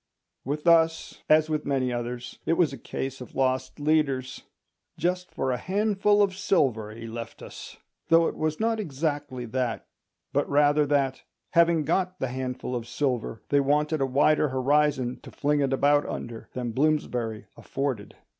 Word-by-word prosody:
With 150 +4 -3
us, 165 -1 +3
as 155 0 +5
with 155 -1 -1
many 130 -3 0
others, 120 0 -5
it - - +3
was 165 -4 +2
a - - -6
case 135 +3 -5
of 125 - -10
lost 130 +2 0
leaders. 145 -4 0 0.6
"Just 180 +1 -1
for 130 - -2
a 125 - 0
handful 205 - +2
of 195 -2 0
silver 135 - +1
he 115 +2 -9
left 115 0 -7
us"; - - -10 0.3
though 165 0 +5
it - - -3
was 155 0 -2
not 225 0 +1
exactly 145 - -3
that, 125 0 -2 0.5
but - - +1
rather 145 +1 +4
that, 140 -2 +1 0.3
having 170 -2 +4
got 185 +3 0
the 130 - -1
handful 130 0 -4
of 120 -1 -4
silver, 120 -3 -2
they 145 - +4
wanted 150 +2 +1
a 135 - +2
wider 145 +3 +3
horizon 130 -1 +1
to - - -11
fling 150 +1 0
it 135 -2 +1
about 145 +2 +3
under 115 -1 -6
than 125 -2 -3
Bloomsbury 125 -5 0
afforded. 135 -7 -4
140 Hz, 165 wpm, -26 LUFS, 125-155 Hz, 0.6 s, as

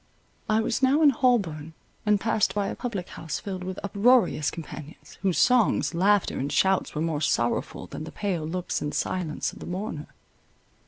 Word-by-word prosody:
I 215 +1 +3
was 230 +3 -1
now 275 +4 +4
in 290 - +7
Holborn, 190 - +1 0.3
and 210 -1 +4
passed 220 -1 +1
by 205 -1 0
a - - -4
public 205 -8 -4
house 160 - -5
filled 190 -2 -5
with 185 +1 -5
uproarious 200 - +3
companions, 155 -2 -10
whose 190 -3 +1
songs, 250 -7 +3
laughter, 195 +3 +2
and 140 +2 -2
shouts 190 -3 +2
were 155 - -1
more 160 -3 -1
sorrowful 120 -5 0
than 155 - -7
the 160 - -8
pale 190 -6 -2
looks 180 +2 -3
and 150 0 -3
silence 180 -5 -2
of - - -12
the - - -8
mourner. 180 -4 -4
185 Hz, 175 wpm, -26 LUFS, 160-215 Hz, 0.3 s, in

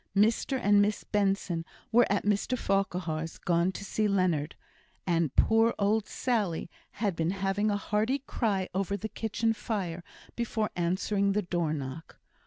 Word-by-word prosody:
Mr 225 +6 +2
and 205 -3 +5
Miss 205 +1 0
Benson 195 -4 0 0.3
were 240 -1 +4
at 205 - +1
Mr 210 +5 +1
Farquhar's, 175 -6 -1
gone 170 +1 +1
to 200 - -7
see 215 +2 0
Leonard, 180 -7 +1 0.5
and 165 -5 +1
poor 225 +1 +4
old 210 +1 +1
Sally 205 -10 -1 0.2
had 205 -4 -1
been 165 0 0
having 195 +2 0
a 205 - +1
hearty 215 +6 0
cry 220 -8 -1
over 195 +1 -1
the 220 - -4
kitchen 225 +2 -1
fire 190 -6 -3 0.3
before 220 -2 -1
answering 195 +3 +1
the 210 +1 +1
door 175 -3 -1
knock. 140 +1 -6
200 Hz, 150 wpm, -29 LUFS, 175-215 Hz, 0.5 s, and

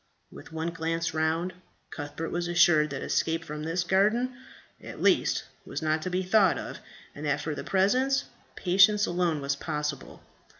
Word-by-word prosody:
With - - -12
one 160 +1 -3
glance 165 0 -2
round, 160 +3 0 0.4
Cuthbert 145 +2 -5
was 175 0 -2
assured 175 -3 +4
that 135 -1 -5
escape 165 +1 0
from 150 0 -6
this 165 +3 -1
garden, 215 +8 +2 0.5
at - - -9
least, - - +2 0.2
was - - -6
not 155 0 +1
to 185 - -3
be 185 +1 -1
thought 190 0 +4
of, - - -6 0.3
and 145 - -9
that 145 - +1
for 155 +1 -3
the - - -6
present, 255 +8 +2 0.3
patience 200 +3 +4
alone 175 -4 0
was 140 0 -1
possible. 150 -1 -4
165 Hz, 165 wpm, -28 LUFS, 155-185 Hz, 0.5 s, assured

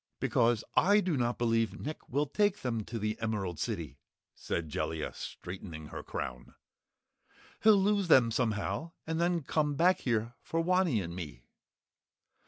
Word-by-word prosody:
"Because 115 -1 +2
I 205 +3 +5
do 185 -6 0
not 120 -2 0
believe 115 -3 +1
Nick 155 +2 -6
will 145 +4 +1
take 205 +7 +1
them 115 -4 -1
to 115 - -5
the 110 0 -2
Emerald 100 -6 -2
City," - - -4 0.3
said 85 -2 -3
Jellia, 75 +1 -3
straightening 85 -4 -7
her - - -6
crown. 60 -2 -6 1.1
"He'll 215 -1 +7
lose 200 0 +2
them 125 -8 +6
somehow 115 - -1
and 160 +1 -1
then 170 -2 +1
come 150 +1 0
back 180 +5 +4
here 115 -1 -1
for 165 - -2
Wanny 175 - +2
and 85 0 -6
me." 75 -9 -7
120 Hz, 150 wpm, -31 LUFS, 105-165 Hz, 1.1 s, He'll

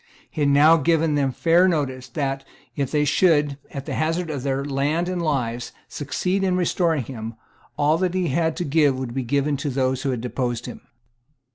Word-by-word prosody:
He 155 - -4
had 145 - +3
now 150 +4 +6
given 160 0 +2
them 140 -2 +1
fair 170 +6 +3
notice 135 -7 -1
that, 135 +1 -3 0.3
if 140 -3 -1
they 150 -1 +1
should, 150 -3 +2
at 140 -1 -7
the - - -4
hazard 165 +1 -1
of 140 -4 -4
their 135 +1 -1
lands 145 +5 0
and 180 -1 -2
lives, 125 -6 -2
succeed 180 +7 -2
in 185 -1 +1
restoring 170 -4 +1
him, 115 -2 -7 0.4
all 150 +2 +2
that 185 -1 0
he 185 -2 0
had 160 +3 0
to 175 - -2
give 145 -2 +3
would 130 -2 -4
be 135 - -1
given 140 +3 0
to 145 +1 -3
those 130 -1 0
who 140 - -1
had 125 -3 -2
deposed 120 -1 -3
him. - - -8
145 Hz, 200 wpm, -23 LUFS, 130-165 Hz, 0.4 s, now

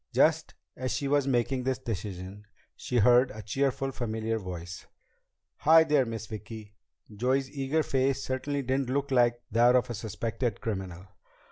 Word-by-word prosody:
Just - - +2 0.2
as 130 0 -3
she 140 - -1
was 140 -1 +2
making 130 0 +1
this 130 0 -1
decision, 100 -3 -6 0.3
she 125 - -3
heard 125 +3 +5
a 110 0 -9
cheerful, 135 +5 -1
familiar 110 -2 -2
voice: 90 -2 -7 0.7
"Hi 160 +1 +6
there, 150 -5 +2
Miss 115 -2 -5
Vicki!" 110 -1 -9 0.4
Joey's 130 +4 0
eager 145 +2 0
face 135 -1 0
certainly 140 +2 -2
didn't 130 0 -1
look 140 +1 -1
like 120 -2 +3
that 120 +2 +5
of 125 -1 +2
a - - -2
suspected 110 +1 -3
criminal. 95 -4 -5
120 Hz, 150 wpm, -28 LUFS, 110-135 Hz, 0.7 s, Hi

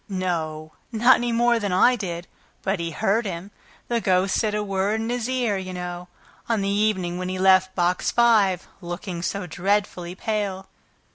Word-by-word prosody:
"No, 160 -5 -3 0.2
not 240 +3 +5
any 240 0 -1
more 235 0 +3
than 205 -3 -2
I 215 +7 +5
did; 175 -6 -5 0.4
but 195 -1 0
he 170 0 -2
heard 215 +6 0
him. 180 +2 -6 0.4
The 235 -1 0
ghost 190 0 +2
said 215 -2 +1
a 210 - 0
word 200 +2 0
in 225 +1 -2
his 245 0 -2
ear, 245 -6 0
you 185 -1 -6
know, 180 0 -6 0.4
on 225 -3 +1
the 195 - 0
evening 200 -4 0
when 185 0 -3
he 185 - -3
left 190 0 +4
Box 180 0 +1
Five, 215 -7 +3
looking 175 0 -5
so 200 +2 -2
dreadfully 180 0 -1
pale." 200 -2 -3
195 Hz, 180 wpm, -24 LUFS, 180-215 Hz, 0.4 s, not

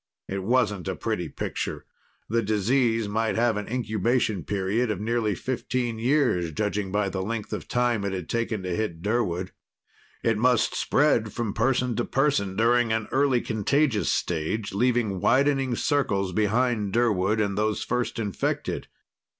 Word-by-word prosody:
It 95 0 -3
wasn't 105 -4 +1
a - - -2
pretty - - -2
picture. - - -4 0.4
The 115 +2 +1
disease 115 +2 +1
might 110 +1 0
have 115 -1 +2
an 105 0 -4
incubation 110 -4 0
period 100 +6 0
of 105 -4 -2
nearly 110 -1 0
fifteen 120 0 -2
years, 120 - +2
judging 100 +3 -2
by 105 0 +1
the 95 0 -3
length 110 +2 -4
of - - -5
time 120 -4 +1
it 100 - -1
had 90 -4 -4
taken 115 -4 -2
to 90 -1 -2
hit 85 -6 -3
Durwood. 95 -5 -1 0.7
It 115 -2 +1
must 120 -2 +3
spread 125 -7 +2
from 115 -4 -2
person 125 +1 +1
to 120 - +1
person 135 -10 +1
during 115 +1 +3
an 110 -1 -1
early 135 -2 +3
contagious 115 +2 +1
stage, 90 +6 -1
leaving 115 -3 +1
widening 135 +2 +2
circles 100 - 0
behind 110 0 +1
Durwood 110 -3 +2
and 100 -2 0
those 105 +1 0
first 125 0 -2
infected. 105 -5 -2
110 Hz, 150 wpm, -26 LUFS, 100-120 Hz, 0.7 s, must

